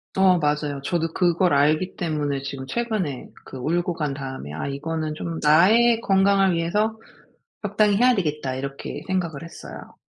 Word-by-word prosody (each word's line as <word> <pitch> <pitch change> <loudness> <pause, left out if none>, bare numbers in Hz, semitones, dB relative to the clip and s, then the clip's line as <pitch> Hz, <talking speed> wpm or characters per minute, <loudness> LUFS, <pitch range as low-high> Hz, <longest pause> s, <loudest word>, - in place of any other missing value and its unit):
어. 190 -2 +5
맞아요. 150 -2 -1
저도 165 0 -1
그걸 175 -1 +2
알기 155 +6 +2
때문에 150 -5 -2
지금 135 -1 -6
최근에 210 - -3
그 130 - -9
울고 170 +6 -1
간 150 -3 -2
다음에 130 - -7
'아 80 - -4
이거는 155 +2 -3
좀 165 +1 -5
나의 220 +10 +5
건강을 195 -2 +3
위해서 210 +7 0 0.6
적당히 205 0 +2
해야 250 +2 +5
되겠다.' 150 - -2
이렇게 135 +1 -6
생각을 170 -6 -2
했어요. 165 - -11
165 Hz, 325 characters per minute, -23 LUFS, 145-190 Hz, 0.6 s, 어